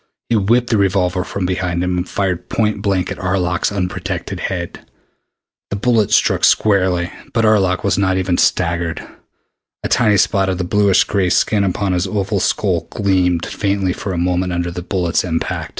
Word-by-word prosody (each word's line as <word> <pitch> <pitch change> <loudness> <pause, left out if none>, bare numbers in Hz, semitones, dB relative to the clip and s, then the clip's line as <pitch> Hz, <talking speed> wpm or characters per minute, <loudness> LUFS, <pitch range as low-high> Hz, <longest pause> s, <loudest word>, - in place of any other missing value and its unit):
He 120 - +2
whipped 115 +4 +2
the 110 - +3
revolver 90 -2 +1
from 100 0 -4
behind 90 -1 -1
him 90 0 -1
and 90 - -3
fired 90 -3 -2
point 105 -2 0
blank 95 -3 0
at - - -6
Arlok's 90 -2 0
unprotected 90 -3 -4
head. 85 -3 -4 0.9
The - - -3
bullet 110 -1 +1
struck - - +2
squarely, 95 -4 +2 0.2
but 115 -1 +2
Arlok 95 -5 +2
was - - +1
not 95 -1 +1
even 90 -2 0
staggered. 85 -2 0 0.8
A - - -1
tiny 110 -4 +3
spot 95 0 +2
of 95 - -1
bluish 100 -2 +4
gray 95 -3 0
skin 100 +3 +2
upon 95 0 -1
his 90 +1 0
oval 100 0 -1
skull 90 -3 0
gleamed 90 -4 +1
faintly 100 -2 -1
for 100 - -5
a 90 - -3
moment 90 +1 0
under 85 0 -2
the 90 +1 -6
bullet's 90 -2 -1
impact. 80 -2 -3
95 Hz, 170 wpm, -18 LUFS, 90-100 Hz, 0.9 s, bluish